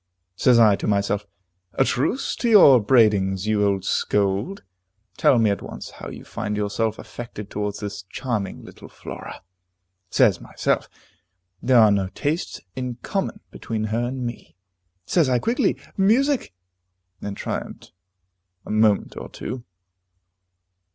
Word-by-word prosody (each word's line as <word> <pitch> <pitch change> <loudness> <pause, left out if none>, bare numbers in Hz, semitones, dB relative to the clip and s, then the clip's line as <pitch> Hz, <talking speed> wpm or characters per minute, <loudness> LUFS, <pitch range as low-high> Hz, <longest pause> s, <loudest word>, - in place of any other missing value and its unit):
Says 125 +4 +4
I 110 -3 +6
to - - -4
Myself, 100 0 0 0.5
"A - - +4
truce 190 - 0
to 240 - 0
your 185 - +8
upbraidings, 105 -5 +3
you 105 -1 +2
old 100 -2 +1
scold; 100 - 0 0.5
tell 130 - +4
me 110 -3 +3
at 100 - -2
once - - -8
how - - -9
you - - -10
find 105 0 -4
yourself 105 +2 -1
affected 110 -4 -8
towards 105 0 -3
this 100 -3 -5
charming 110 -7 -3
little - - -13
Flora." - - -9 0.7
Says - - +3
Myself, - - -1 0.7
"There 130 0 +4
are 110 -2 +7
no 100 -2 +1
tastes 155 +4 -2 0.2
in 125 -2 -4
common 200 +1 -3
between 110 -1 -4
her 115 +1 +1
and 125 0 -4
me." 120 0 -7 0.5
Says 160 - +2
I, 125 - +3
quickly, 230 - +1 0.2
"Music!" 245 - +2 0.7
and 100 -1 -5
triumphed - - -5 0.7
a - - -6
moment 110 -1 +2
or - - -7
two. 125 +1 -7
110 Hz, 140 wpm, -23 LUFS, 100-130 Hz, 0.7 s, your